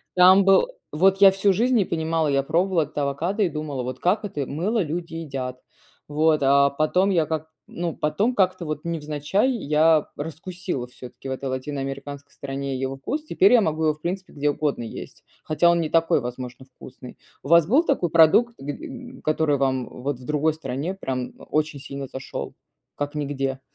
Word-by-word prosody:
Там 185 +2 +7
был 195 - +5 0.3
вот 190 +5 +4
я 195 -1 +9
всю 195 +1 +2
жизнь 240 +7 +2
не 215 - +4
понимала, 160 -1 0
я 140 -1 +2
пробовала 175 +2 +1
этот 150 - -12
авокадо 165 +9 -1
и 180 - +2
думала: 150 -5 -4
"Вот 130 +1 -5
как 190 +5 +1
это 150 -9 -3
мыло 195 - -1
люди 165 +1 -4
едят?" 135 -5 -5 0.5
Вот. 155 +1 +2
А 140 +1 +5
потом 155 +7 +1
я 170 -5 +2
как 160 0 -4 0.2
ну, 170 -1 -4
потом 200 +12 0
как-то 185 -2 +1
вот 155 -1 -4
невзначай 155 - 0
я 155 - +3
раскусила 160 -2 -5
всё-таки 125 +1 -10
в - - -3
этой 130 0 -4
латиноамериканской 140 +1 -5
стране 135 -1 -4
его 135 0 -2
вкус, 295 - -4
теперь 200 -7 +4
я 240 - +7
могу 160 -2 0
его 155 - +3
в 155 - -29
принципе 185 +3 -4
где 145 0 +1
угодно 145 -5 -2
есть, 115 - -9 0.2
хотя 170 +3 +3
он 170 -1 +2
не 155 - -2
такой, 165 -4 +3
возможно, 125 +1 -7
вкусный. 130 -1 -13 0.3
У - - -8
вас 170 -1 +6
был 275 - +4
такой 185 - 0
продукт, 165 +9 +5
гд 145 - -6
м, 255 -4 -9
который 155 -2 +1
вам 130 -2 0
вот 130 0 -4
в 125 - -12
другой 150 +1 +1
стране 150 +3 -4
прям 130 -8 -4
о - - -12
очень 155 -1 -1
сильно 140 0 -6
зашел, 135 0 -6 0.4
как 145 +1 -3
нигде? 135 -2 -2
155 Hz, 185 wpm, -24 LUFS, 140-180 Hz, 0.5 s, я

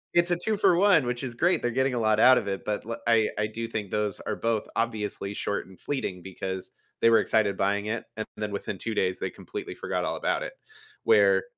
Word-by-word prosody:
it's 175 0 +4
a 175 - +2
2 215 -2 +1
for 175 - +4
1, 180 -7 +5
which 125 +1 -2
is 120 -2 -4
great. 175 +8 +2
They're 120 - 0
getting 130 +1 +1
a 120 - 0
lot 110 -1 +2
out 130 0 +8
of 100 - -7
it, 95 -1 -3
but, 105 -1 -2
l 115 - -3
I 115 -2 +4
I 105 - +1
do 115 +1 -5
think 105 -4 -4
those 105 -2 -1
are - - -3
both 115 -2 -1
obviously 105 -3 -2
short 100 - -2
and 95 - -16
fleeting 95 -11 -3
because 95 0 -5 0.3
they 115 - +6
were 115 - +6
excited 105 -3 +2
buying 100 +1 0
it, 115 +1 -3
and 110 - -2
then 105 -1 -3
within 100 0 -4
2 115 +3 -4
days, 95 0 0
they - - -2
completely - - -7
forgot - - -2
all - - -1
about - - -1
it. - - -6 0.5
Where 100 -2 +5
110 Hz, 240 wpm, -27 LUFS, 100-120 Hz, 0.5 s, out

